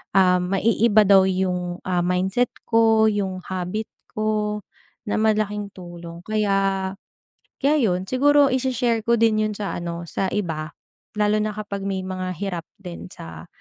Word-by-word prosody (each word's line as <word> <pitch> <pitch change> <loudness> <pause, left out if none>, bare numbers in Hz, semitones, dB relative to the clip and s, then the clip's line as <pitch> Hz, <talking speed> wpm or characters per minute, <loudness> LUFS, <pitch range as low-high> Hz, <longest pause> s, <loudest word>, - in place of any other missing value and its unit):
ah, 180 -1 +5
maiiba 210 +4 +3
daw 195 -1 +7
yung, 180 -2 -1
ah, 180 -1 0
mindset 185 +7 +1 0.2
ko, 225 -1 +4
yung 190 -3 -2
habit 185 +4 -3 0.3
ko, 215 -1 0 0.5
na 210 - 0
malaking 210 -1 +1
tulong. 175 -1 -10
Kaya, 195 -2 +1 0.8
kaya 290 +3 +4
yun. 185 -9 +1
Siguro 285 +2 +4
i-she-share 250 -2 +1
ko 235 - +4
din 215 -1 +3
yun 215 - -3
sa 205 -1 -4
ano 170 0 -5
sa 190 - -2
iba. 160 -6 -3 0.4
Lalo 210 0 +2
na 215 0 -1
kapag 205 -2 -5
may 190 -1 -2
mga 185 -1 -4
hirap 180 -4 -4 0.2
din 175 -2 -8
sa 80 - -10
200 Hz, 145 wpm, -23 LUFS, 180-215 Hz, 0.8 s, daw